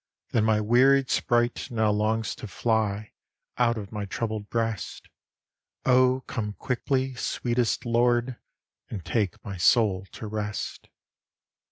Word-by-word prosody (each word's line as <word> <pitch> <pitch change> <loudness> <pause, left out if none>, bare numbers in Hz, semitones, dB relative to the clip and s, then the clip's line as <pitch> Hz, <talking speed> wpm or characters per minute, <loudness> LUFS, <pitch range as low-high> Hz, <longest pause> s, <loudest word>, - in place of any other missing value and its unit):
Than 110 -3 +2
my 110 -1 +3
wearied 130 +5 +4
sprite 120 -1 +1
now 110 -3 +2
longs 110 +1 0
to 120 - -7
fly 110 -1 -1 0.5
out 120 -1 +3
of 100 -2 -6
my 105 -2 -4
troubled 105 +1 -4
breast. 115 -4 -3 0.8
O 130 0 +4
come 105 -2 -3
quickly, 130 +3 -1
sweetest 120 -1 -1
Lord, 120 +1 +2 0.5
and 100 -5 -6
take 105 -1 -1
my 100 -3 -5
soul 95 -1 +3
to - - -7
rest! 105 -1 -4
115 Hz, 125 wpm, -26 LUFS, 105-120 Hz, 0.8 s, wearied